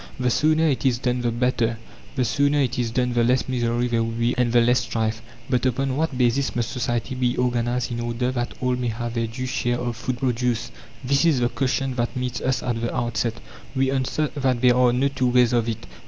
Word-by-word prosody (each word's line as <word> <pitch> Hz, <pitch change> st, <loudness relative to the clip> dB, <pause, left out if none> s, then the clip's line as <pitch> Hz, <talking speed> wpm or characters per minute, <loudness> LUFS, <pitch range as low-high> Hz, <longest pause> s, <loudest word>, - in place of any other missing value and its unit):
The 125 Hz, -1 st, +1 dB
sooner 155 Hz, +4 st, +3 dB
it 140 Hz, -4 st, 0 dB
is 130 Hz, -3 st, +2 dB
done 125 Hz, 0 st, -1 dB
the 120 Hz, -, +1 dB
better; 120 Hz, -1 st, 0 dB, 0.4 s
the 130 Hz, -, +1 dB
sooner 140 Hz, +5 st, +2 dB
it 130 Hz, -2 st, 0 dB
is 120 Hz, -2 st, 0 dB
done 125 Hz, +1 st, 0 dB
the 120 Hz, -1 st, +2 dB
less 125 Hz, +2 st, +2 dB
misery 120 Hz, -1 st, 0 dB
there 115 Hz, -1 st, +1 dB
will 115 Hz, -, -2 dB
be 115 Hz, +2 st, 0 dB
and 125 Hz, -2 st, +1 dB
the 120 Hz, -, +5 dB
less 120 Hz, +1 st, +4 dB
strife. 110 Hz, -2 st, -2 dB, 0.3 s
But 125 Hz, -2 st, 0 dB
upon 130 Hz, +1 st, 0 dB
what 150 Hz, -3 st, -1 dB
basis 125 Hz, +2 st, +1 dB
must 120 Hz, -1 st, -1 dB
society 120 Hz, 0 st, -2 dB
be 125 Hz, -1 st, 0 dB
organized 120 Hz, 0 st, 0 dB
in 120 Hz, -, -3 dB
order 120 Hz, +2 st, -1 dB
that 120 Hz, -1 st, -3 dB
all 125 Hz, 0 st, +1 dB
may 125 Hz, -1 st, -2 dB
have 120 Hz, +1 st, -3 dB
their 115 Hz, -1 st, -1 dB
due 125 Hz, +3 st, -5 dB
share 120 Hz, -2 st, -1 dB
of 120 Hz, -1 st, -3 dB
food 125 Hz, +2 st, -3 dB
produce? 120 Hz, -2 st, -1 dB, 0.3 s
This 140 Hz, +3 st, +2 dB
is 160 Hz, -6 st, +3 dB
the 120 Hz, 0 st, +2 dB
question 135 Hz, 0 st, -1 dB
that 120 Hz, 0 st, -1 dB
meets 125 Hz, -1 st, -3 dB
us 130 Hz, -1 st, 0 dB
at 120 Hz, -2 st, -2 dB
the 115 Hz, -, -1 dB
outset. 120 Hz, -1 st, -1 dB, 0.4 s
We 135 Hz, 0 st, +2 dB
answer 135 Hz, +3 st, 0 dB
that 130 Hz, -4 st, 0 dB
there 125 Hz, -1 st, +5 dB
are 125 Hz, -1 st, +4 dB
no 130 Hz, +3 st, +2 dB
two 135 Hz, -2 st, 0 dB
ways 125 Hz, -1 st, +4 dB
of 120 Hz, -1 st, +1 dB
it. 115 Hz, +1 st, -5 dB
125 Hz, 230 wpm, -23 LUFS, 120-130 Hz, 0.4 s, the